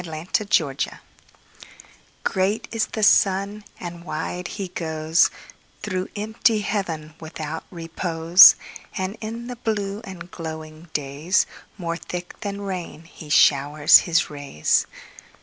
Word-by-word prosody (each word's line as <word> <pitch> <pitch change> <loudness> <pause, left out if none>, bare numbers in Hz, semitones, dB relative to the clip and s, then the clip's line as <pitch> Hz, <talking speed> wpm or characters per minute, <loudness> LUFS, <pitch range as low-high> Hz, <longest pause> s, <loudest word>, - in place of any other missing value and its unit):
Summer 160 -1 -7 0.3
Sun 140 -5 +2 1.5
GREAT 195 +3 0
is 225 -2 0
the 215 - -4
sun, 200 +1 +3 0.2
and 170 -1 -7
wide 175 +1 -4
he 195 +1 -5
goesThrough 170 +4 -2
empty 215 +1 +1
heaven 165 -7 -3
without 160 0 -6
repose; 165 0 +6 0.4
And 190 +2 -2
in 230 +2 -5
the 250 0 -7
blue 205 -3 -2
and 180 -4 -10
glowing 160 0 -8
daysMore 165 +4 -2
thick 180 0 -7
than 200 -1 -5
rain 180 -5 -5
he 160 -2 -13
showers 145 +1 +6
his 165 -2 +1
rays. 140 - 0
175 Hz, 110 wpm, -23 LUFS, 160-200 Hz, 1.5 s, repose